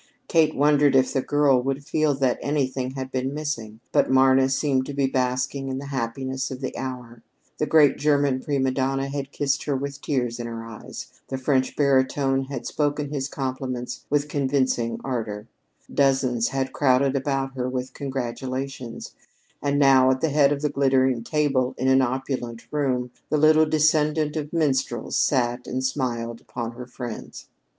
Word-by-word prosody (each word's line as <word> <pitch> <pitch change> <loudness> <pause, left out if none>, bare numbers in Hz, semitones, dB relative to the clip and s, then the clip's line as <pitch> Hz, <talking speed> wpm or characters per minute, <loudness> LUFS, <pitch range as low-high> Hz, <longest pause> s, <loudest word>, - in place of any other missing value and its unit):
Kate 160 -2 +3
wondered 145 -1 +4
if 130 -1 +3
the 135 - +1
girl 145 -2 +3
would 135 +2 -3
feel 155 -2 +1
that 130 -2 +1
anything 130 -2 -1
had 130 -1 -5
been 130 +2 -2
missing, 115 -8 -4
but - - +3
Marna 130 0 +5
seemed 135 -1 +1
to 145 - -5
be 140 -1 +2
basking 130 +1 -1
in 130 - -3
the 140 - -6
happiness 130 +1 -3
of 130 - -6
the 130 - -4
hour. 125 -3 -6 0.4
The 150 - 0
great 150 -3 +5
German 145 -2 +2
prima 135 -1 0
donna 135 +1 -1
had 140 0 -4
kissed 145 0 -1
her 145 - 0
with 140 +1 -4
tears 125 -4 -1
in 120 - -4
her 115 -1 -6
eyes; 115 -2 -10
the 135 - -3
French 130 -1 0
baritone 135 -1 +2
had 135 -2 -6
spoken 145 -1 -1
his 140 -2 -2
compliments 130 -3 -4
with 145 0 +1
convincing 130 -5 0
ardor; 110 -5 -4 0.5
dozens 130 -4 +2
had 135 +1 -2
crowded 135 0 +3
about 135 -1 -1
her 125 -1 -2
with 130 0 -4
congratulations; 130 -1 -5 0.5
and 145 0 0
now, 135 -2 +6
at 130 0 +2
the 160 - +2
head 145 -1 +4
of 145 0 -2
the 150 - +2
glittering 130 -3 +2
table 135 -2 0
in 130 - -1
an 130 0 +5
opulent 130 -2 -3
room, 130 -4 -1 0.2
the 155 - +2
little 155 +1 +5
descendant 155 0 +2
of 150 -1 -4
minstrels 135 -7 0
sat 125 -2 +1
and 130 +1 -2
smiled 120 -4 -2
upon 120 -2 -5
her 125 +1 -9
friends. 120 -2 -8
135 Hz, 170 wpm, -24 LUFS, 130-145 Hz, 0.5 s, now